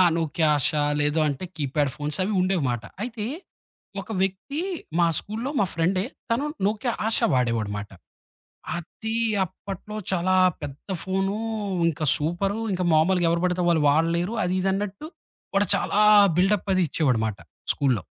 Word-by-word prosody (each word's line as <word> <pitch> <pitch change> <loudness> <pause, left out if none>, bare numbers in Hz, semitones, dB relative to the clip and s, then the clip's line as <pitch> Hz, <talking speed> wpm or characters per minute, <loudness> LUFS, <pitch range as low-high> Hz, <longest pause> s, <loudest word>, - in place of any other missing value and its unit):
ఆ! - - +8
'నోక్య 165 0 -2
ఆష' 145 +1 +1 0.3
లేద 145 +1 +1
అంటే 140 +5 -3
కీప్యాడ్ 145 -1 0
ఫోన్స్ 150 0 -3
అవి 210 - -1
ఉండేవమాట. 150 -11 0 0.2
అయితే, 230 -2 -4 0.8
ఒక 215 +3 -7
వ్యక్తి 195 - -2 0.4
మా 170 - +5
స్కూల్లో 225 +6 -4
మా 200 - +3
ఫ్రెండే 180 +4 +1 0.3
తను 260 +6 0 0.2
'నోక్య 215 +4 -1 0.2
ఆష' 225 - +2
వాడేవాడనమాట. 110 -5 -1 0.9
అది 220 +6 -5 0.3
అప్పట్లో 195 +3 -8 0.2
చాలా 185 +1 +1 0.3
పెద్ద 145 +3 -8
ఫోను 195 +1 -1 0.5
ఇంకా 160 -1 -2
సూపరు. 185 +7 -1
ఇంక 180 - -2
మామూలుగా 175 +3 +3
ఎవరు 170 +1 0
పడితే 180 0 0
వాళ్ళు 165 -3 +3
వాడలేరు. 170 +6 +1
అది 180 +1 0
ఇదిన్నట్టు 195 +6 -2 0.5
వాడు 200 +1 +3
చాలా - - -1 0.4
బిల్డప్పది 190 0 +2
ఇచ్చేవాడమాట 115 -9 0 0.3
స్కూల్లో. 130 -8 0
180 Hz, 130 wpm, -25 LUFS, 150-195 Hz, 0.9 s, ఆ